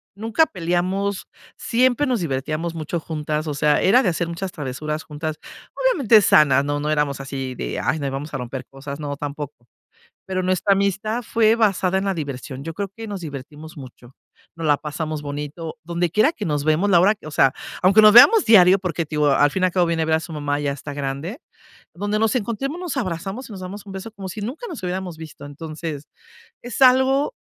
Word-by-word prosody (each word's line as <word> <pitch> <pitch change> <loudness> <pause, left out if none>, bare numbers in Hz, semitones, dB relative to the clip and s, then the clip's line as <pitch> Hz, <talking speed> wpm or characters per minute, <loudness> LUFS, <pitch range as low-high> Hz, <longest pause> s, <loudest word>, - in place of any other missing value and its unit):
nunca 225 +10 +2
peleamos. 185 +3 -2 0.3
Siempre 255 +3 +2
nos 245 -7 0
divertíamos 155 +3 -2
mucho 165 +1 -3
juntas. 155 -1 -3
O 150 - -2
sea, 150 0 +2
era 225 +7 +5
de 200 - +1
hacer 170 0 -2
muchas 170 +3 -5
travesuras 150 +1 -4
juntas, 155 0 -5 0.4
obviamente 280 - +4
sanas. 140 -4 +5
No 145 0 -1
no 150 +1 -2
éramos 150 -2 0
así 135 -1 -5
de: - - -4
"Ay, 160 - 0
no, 140 -1 -2
vamos 145 +3 -6
a 135 - -1
romper 125 +1 -6
cosas", 140 +2 -9
no 145 -1 -4
tampoco. 145 -3 -7 0.6
Pero, 185 -1 -2
nuestra 185 +2 +2
amistad 200 +4 -1
fue 225 0 +3
basada 195 -4 +2
en 190 - -1
la 195 - +1
diversión. 140 -4 -6
Yo 165 +1 -5
creo 200 +2 -4
que 225 +3 -9
nos 200 -3 -5
divertimos 150 +1 -9
mucho, 125 -2 -12 0.4
nos 165 -1 -3
la 145 - +5
pasamos 155 +1 -5
bonito, 150 +3 -6
donde 170 0 -1
quiera 215 - +3
que 220 - -7
nos 150 -2 -1
vemos 155 +6 +2
la 175 -3 +6
hora 205 +4 +4
que, 200 - -13
o - - -7
sea, 135 -2 +3 0.3
aunque 195 +4 +6
nos 215 0 +8
veamos 405 - +9
diario, 190 -4 +7
porque 180 -3 -3 0.3
al 145 0 +4
fin 190 - -2
y - - +6
al 180 - -3
cabo 180 -1 +2
viene 165 -1 0
a - - -1
ver 160 0 +2
a - - +1
su 165 +1 -8
mamá, 145 -1 -2
ya 140 -1 -1
está 145 +1 -8
grande, 145 - -4 0.5
donde 205 +3 -2
nos 225 +3 +1
encontremos, 250 +7 -2
nos 345 -6 -4
abrazamos 195 +4 -4
y - - -8
nos 190 - -8
damos 195 +3 -8
un 195 - -9
beso, 195 +3 -7
como 195 -3 -8
si 210 +4 -7
nunca 260 - -5
nos 285 - -8
hubiéramos 180 -1 -3
visto. 155 -3 -10
Entonces 155 0 -7 0.5
es 245 +2 -6
algo 265 - +4
170 Hz, 210 wpm, -22 LUFS, 150-205 Hz, 0.6 s, veamos